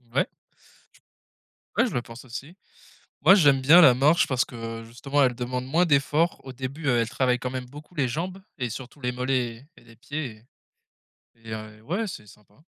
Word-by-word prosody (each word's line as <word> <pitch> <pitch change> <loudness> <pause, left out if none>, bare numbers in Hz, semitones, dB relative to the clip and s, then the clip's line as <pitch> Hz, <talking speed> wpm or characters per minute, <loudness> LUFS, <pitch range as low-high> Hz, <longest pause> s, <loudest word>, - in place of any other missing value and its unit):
Ouais. - - +3 1.5
Ouais, - - +5
je - - -6
le 120 - 0
pense 115 0 -12
aussi. 135 +7 -8 0.7
Moi - - +8
j'aime 145 -8 +5
bien 155 +7 +8
la 140 -7 +9
marche 150 +7 +4
parce 130 -2 +2
que, 115 -1 -7
justement, 135 +5 -2
elle 125 -1 +2
demande 125 +1 -3
moins 165 +7 +3
d'effort 150 +2 +2
au 130 - -8
début, 135 +4 -6
heu, 130 -3 +3
elle 115 - 0
travaille 125 0 +1
quand 125 - -3
même 130 -1 -5
beaucoup 150 +6 -13
les 140 -4 +2
jambes 175 +9 -4 0.2
et 125 -3 -2
surtout 130 +5 -8
les 125 -2 -1
mollets 125 -1 -1 0.2
et - - -17
et - - -23
les 115 -1 -18
pieds 125 -3 -6 0.9
et 115 -1 -13
et - - -5
un 110 -1 -6
et - - -20
ouais 185 - -2
c'est 140 - -8
sympa. 105 0 -19
130 Hz, 205 wpm, -25 LUFS, 120-145 Hz, 1.5 s, la